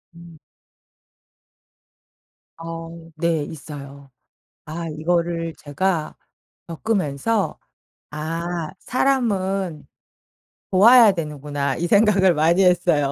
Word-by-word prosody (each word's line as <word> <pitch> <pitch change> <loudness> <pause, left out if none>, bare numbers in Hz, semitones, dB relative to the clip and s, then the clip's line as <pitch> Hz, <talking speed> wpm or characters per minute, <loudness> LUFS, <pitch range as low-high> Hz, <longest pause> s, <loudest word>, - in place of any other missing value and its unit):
음. 170 -1 -14 2.2
어 165 0 -8
네 165 -1 0
있어요. 140 -2 -10 0.5
아 165 +2 -5
이거를 165 +1 -1
제가 155 +2 -2 0.5
겪으면서 190 +2 -1 0.5
'아 165 +2 -4
사람은 195 - -1 0.8
도와야 225 +3 +7
되는구나.' 150 -4 -3
이 175 - -1
생각을 195 -2 +4
많이 165 +4 +3
했어요. 175 -6 +2
170 Hz, 165 characters per minute, -22 LUFS, 155-190 Hz, 2.2 s, 도와야